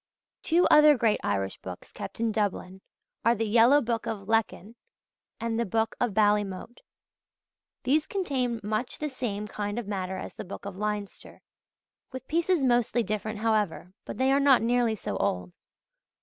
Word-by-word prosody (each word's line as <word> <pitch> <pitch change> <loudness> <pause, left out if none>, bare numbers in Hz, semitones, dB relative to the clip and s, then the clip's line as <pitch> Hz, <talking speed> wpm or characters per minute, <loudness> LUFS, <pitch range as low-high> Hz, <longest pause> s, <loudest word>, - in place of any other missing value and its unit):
Two 340 +2 +3
other 300 -1 +7
great 225 -3 +2
Irish 95 -1 -2
books 90 -1 -9
kept 200 0 -8
in 230 -1 +1
Dublin 190 -3 -2 0.4
are 235 +1 +4
the 225 0 -1
Yellow 235 +6 +5
Book 230 -2 -2
of 205 -3 -5
Lecan 220 -3 0
[Leckan] - - -22 0.6
and 230 0 -2
the - - +2
Book 225 0 +1
of 245 -5 0
Ballymote. 210 +1 +1 1.0
These 295 +5 +2
contain 260 - -1
much 215 +4 -2
the 300 - -3
same 210 -6 -4
kind 205 +1 -4
of 240 -4 -4
matter 190 -2 -3
as - - -7
the - - -7
Book 195 - -9
of 200 -2 -6
Leinster 210 0 -5 0.7
with 260 -1 -8
pieces 340 -1 +1
mostly 240 -2 +2
different 215 0 -4
however 210 -5 0
but - - -7
they 260 +1 +2
are 275 - +4
not 275 -4 +5
nearly 240 -1 +2
so 100 - -4
old. 90 -1 -1
225 Hz, 165 wpm, -27 LUFS, 205-245 Hz, 1.0 s, other